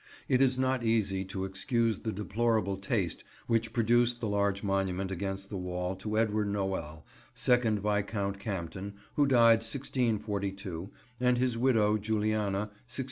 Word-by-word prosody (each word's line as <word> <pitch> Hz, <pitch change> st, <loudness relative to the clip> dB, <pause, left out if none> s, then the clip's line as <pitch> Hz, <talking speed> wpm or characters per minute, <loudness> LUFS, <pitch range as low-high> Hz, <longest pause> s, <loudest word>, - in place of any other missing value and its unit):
It 130 Hz, -1 st, +3 dB
is 130 Hz, -1 st, +4 dB
not 130 Hz, -1 st, +1 dB
easy 105 Hz, -4 st, +1 dB
to 95 Hz, 0 st, -3 dB
excuse 110 Hz, +3 st, 0 dB
the 110 Hz, -, -3 dB
deplorable 105 Hz, 0 st, 0 dB
taste 95 Hz, -2 st, -2 dB, 0.2 s
which 115 Hz, -1 st, +1 dB
produced 120 Hz, +1 st, +3 dB
the 115 Hz, -, -2 dB
large 100 Hz, -1 st, 0 dB
monument 95 Hz, -1 st, -1 dB
against 95 Hz, +1 st, -4 dB
the 100 Hz, -, -3 dB
wall 90 Hz, +1 st, -3 dB
to 105 Hz, +3 st, -3 dB
Edward 110 Hz, -1 st, +1 dB
Noel, 95 Hz, -6 st, -3 dB, 0.3 s
2nd 120 Hz, -3 st, +3 dB
Viscount 100 Hz, -1 st, -1 dB
Campden, 95 Hz, -1 st, -5 dB, 0.2 s
who 145 Hz, -1 st, +3 dB
died 115 Hz, -4 st, +6 dB
1642, 105 Hz, -7 st, -2 dB, 0.3 s
and 125 Hz, 0 st, +3 dB
his 125 Hz, -1 st, +1 dB
widow, 110 Hz, -4 st, +3 dB
Juliana, 105 Hz, -2 st, 0 dB, 0.2 s
1680. 120 Hz, +2 st, -5 dB
105 Hz, 140 wpm, -30 LUFS, 95-115 Hz, 0.3 s, died